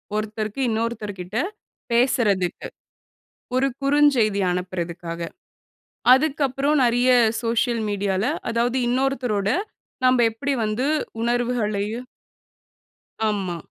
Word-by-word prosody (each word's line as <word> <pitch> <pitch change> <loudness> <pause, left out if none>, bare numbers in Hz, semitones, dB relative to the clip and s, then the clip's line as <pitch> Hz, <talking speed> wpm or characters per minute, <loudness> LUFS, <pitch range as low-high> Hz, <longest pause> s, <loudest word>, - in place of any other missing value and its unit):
ஒருத்தருக்கு 215 +3 -3
இன்னொருத்தர் 220 -2 -2
கிட்ட 190 +5 -5 0.5
பேசுறதுக்கு. 225 -7 +1 0.9
ஒரு 270 +1 +3
குறுஞ்செய்தி 275 -8 +3
அனுப்புறதற்காக. 175 -2 -4 0.9
அதுக்கப்புறம் 280 0 +1
நெறைய 245 +2 +3 0.3
சோசியல் 230 0 0
மீடியா 200 -1 -1
ல, - - +1 0.2
அதாவது 235 +2 0
இன்னொருத்தரோட 245 -6 0 0.6
நாம்ப 255 0 +5
எப்படி 280 +6 -3
வந்து 215 +6 -1 0.4
உணர்வுகளையும் 235 -1 -1 1.2
ஆமா. 190 -5 -2
230 Hz, 85 wpm, -23 LUFS, 205-255 Hz, 1.2 s, நாம்ப